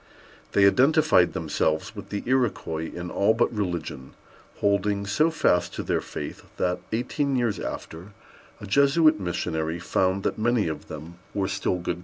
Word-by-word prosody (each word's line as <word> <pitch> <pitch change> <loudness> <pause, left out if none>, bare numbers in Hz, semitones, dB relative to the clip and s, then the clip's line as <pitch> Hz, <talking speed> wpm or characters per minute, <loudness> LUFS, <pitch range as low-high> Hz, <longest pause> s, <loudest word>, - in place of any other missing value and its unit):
They 100 - +5
identified 135 - +4
themselves 80 0 -1
with - - -9
the 100 - -3
Iroquois 110 -11 0
in 85 0 -6
all 105 +3 +3
but 120 - +1
religion, 85 -9 -4 0.4
holding 100 0 +1
so 155 +11 +2
fast 125 - +1
to - - -3
their - - 0
faith, - - -7 0.2
that, 90 0 0
eighteen 135 +4 -1
years 120 -5 0
after, 90 +6 -7 0.5
a - - -8
Jesuit 140 +6 +4
missionary 80 -3 -2
found 95 +2 0
that - - -1
many 115 -3 +2
of 80 - -5
them 80 +3 -9 0.2
were 100 -2 0
still 95 -1 -1
good 85 -1 -3
Catholics. - - -12
100 Hz, 160 wpm, -25 LUFS, 85-120 Hz, 0.5 s, They